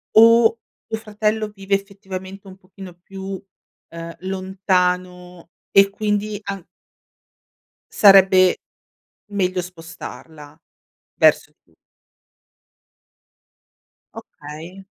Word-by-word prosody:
o 230 Hz, +1 st, +6 dB, 0.3 s
tuo 220 Hz, -, -4 dB
fratello 215 Hz, 0 st, -1 dB
vive, 195 Hz, -1 st, -2 dB
effettivamente, 195 Hz, -1 st, -8 dB
un 190 Hz, 0 st, -12 dB
pochino 190 Hz, -1 st, -13 dB
più, 190 Hz, +2 st, -8 dB, 0.5 s
ehm, 165 Hz, 0 st, -8 dB
lontano? 180 Hz, -2 st, -2 dB, 0.2 s
E 195 Hz, 0 st, +6 dB
quindi 210 Hz, 0 st, -2 dB
an 195 Hz, -3 st, -6 dB, 1.3 s
Sarebbe 190 Hz, -2 st, +6 dB, 0.8 s
meglio 185 Hz, -2 st, 0 dB
spostarla, 165 Hz, -3 st, -11 dB, 0.6 s
verso -, -, +3 dB
più -, -, -33 dB, 2.4 s
Okay. 165 Hz, +6 st, -11 dB
190 Hz, 75 wpm, -21 LUFS, 180-200 Hz, 2.4 s, o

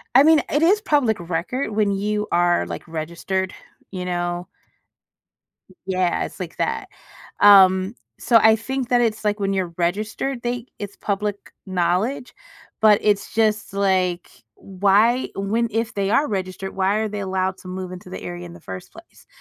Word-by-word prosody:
I 270 Hz, -, +9 dB
mean, 315 Hz, -1 st, +6 dB
it 295 Hz, -, +2 dB
is 395 Hz, +6 st, +4 dB
public 265 Hz, -, +1 dB
record 175 Hz, +10 st, -3 dB
when 210 Hz, -1 st, +1 dB
you 210 Hz, +2 st, -1 dB
are, 175 Hz, 0 st, +2 dB
like, -, -, -7 dB
registered, 170 Hz, +4 st, -3 dB, 0.4 s
you 185 Hz, -2 st, -5 dB
know? 175 Hz, 0 st, -2 dB, 1.4 s
Yeah, 185 Hz, -2 st, 0 dB
it's -, -, -10 dB
like -, -, -6 dB
that -, -, -2 dB, 0.5 s
um, 190 Hz, -1 st, +6 dB, 0.3 s
so 235 Hz, -, +4 dB
I 220 Hz, 0 st, +6 dB
think 255 Hz, +3 st, -4 dB
that 245 Hz, -, +4 dB
it's, 220 Hz, -2 st, 0 dB
like, 210 Hz, 0 st, +1 dB
when 195 Hz, -1 st, 0 dB
you're 185 Hz, -3 st, -2 dB
registered, 215 Hz, +8 st, -2 dB
they 240 Hz, 0 st, -3 dB
it's 205 Hz, -1 st, -6 dB
public 205 Hz, 0 st, -3 dB
knowledge, 185 Hz, +9 st, -1 dB, 0.5 s
but 215 Hz, -1 st, +6 dB
it's 205 Hz, -1 st, +1 dB
just, 215 Hz, -2 st, +1 dB
like, 185 Hz, -3 st, 0 dB, 0.3 s
why 205 Hz, +6 st, +2 dB
when 220 Hz, +4 st, 0 dB
if 225 Hz, +2 st, -1 dB
they 200 Hz, -1 st, -1 dB
are 290 Hz, +6 st, +3 dB
registered, 190 Hz, -1 st, -4 dB
why 190 Hz, +1 st, +1 dB
are 220 Hz, -, 0 dB
they 210 Hz, 0 st, -5 dB
allowed 190 Hz, 0 st, -1 dB
to -, -, -13 dB
move 185 Hz, 0 st, -5 dB
into 185 Hz, 0 st, -10 dB
the -, -, -6 dB
area 175 Hz, 0 st, -6 dB
in 170 Hz, -, -12 dB
the 175 Hz, -, -13 dB
first 95 Hz, -6 st, -8 dB
place? -, -, -17 dB
200 Hz, 165 wpm, -22 LUFS, 185-220 Hz, 1.4 s, I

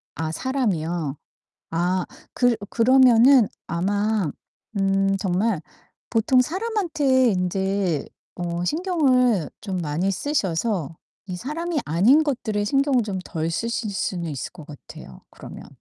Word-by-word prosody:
아 160 Hz, +1 st, -3 dB
사람이요? 170 Hz, -, -2 dB, 0.5 s
아 175 Hz, +2 st, 0 dB, 0.3 s
그 245 Hz, -2 st, +3 dB
그러면은 250 Hz, 0 st, +6 dB, 0.2 s
아마 200 Hz, +1 st, 0 dB, 0.5 s
음 195 Hz, 0 st, +2 dB
정말 190 Hz, 0 st, 0 dB, 0.5 s
보통 240 Hz, +3 st, +3 dB
사람한테 320 Hz, -, +1 dB
인제 190 Hz, -3 st, -1 dB, 0.3 s
어 175 Hz, 0 st, -3 dB
신경을 255 Hz, -, +2 dB
좀 195 Hz, -3 st, -4 dB
많이 170 Hz, +3 st, -1 dB
쓰셔서 190 Hz, -, -1 dB, 0.3 s
이 180 Hz, -, -4 dB
사람이 310 Hz, -, -3 dB
아닌 205 Hz, -, +4 dB
것들에 230 Hz, -8 st, -1 dB
신경을 275 Hz, +1 st, +2 dB
좀 200 Hz, -3 st, -4 dB
덜 160 Hz, -2 st, -3 dB
쓰실 230 Hz, +5 st, -2 dB
수는 175 Hz, -3 st, -3 dB
있을 140 Hz, -3 st, -5 dB
것 165 Hz, -4 st, -12 dB
같아요, 130 Hz, -, -12 dB
그러면. -, -, -11 dB
200 Hz, 230 characters per minute, -23 LUFS, 175-255 Hz, 0.5 s, 그러면은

